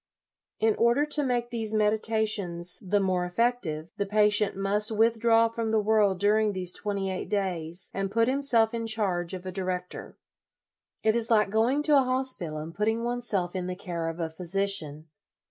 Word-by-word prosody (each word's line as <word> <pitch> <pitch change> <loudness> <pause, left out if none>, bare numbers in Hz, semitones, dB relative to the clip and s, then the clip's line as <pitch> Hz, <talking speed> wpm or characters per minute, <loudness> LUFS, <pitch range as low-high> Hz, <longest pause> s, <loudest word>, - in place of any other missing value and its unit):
In 220 0 +3
order 235 +5 +3
to 300 0 +2
make 245 -2 -1
these 220 -2 -2
meditations 210 -5 0
the 200 +2 +1
more 185 -2 0
effective, 175 -5 -1
the 200 - -2
patient 210 0 +2
must 205 +2 +2
withdraw 225 +1 +3
from 230 0 -3
the 220 - +2
world 205 -3 +2
during 210 +1 +2
these 180 -2 -3
twenty 200 -2 -3
eight 185 - -5
days, 180 -4 -2
and 195 0 -2
put 230 +3 +1
himself 255 -4 +2
in 230 -1 -3
charge 190 -5 -1
of 185 0 -9
a 185 - -4
di 190 +1 -5
rector. 180 -1 -5 0.9
It 220 0 +3
is 230 -1 +1
like 210 -3 +3
going 240 +7 +1
to 300 -1 +4
a - - +5
hospital 255 -11 -2
and 155 +2 -7
putting 220 +4 -1
oneself 235 -7 -2
in 180 -1 -3
the 185 - -4
care 170 -3 -4
of 165 +1 -7
a 165 -1 -3
physician. 170 -3 -1
210 Hz, 180 wpm, -27 LUFS, 180-230 Hz, 0.9 s, a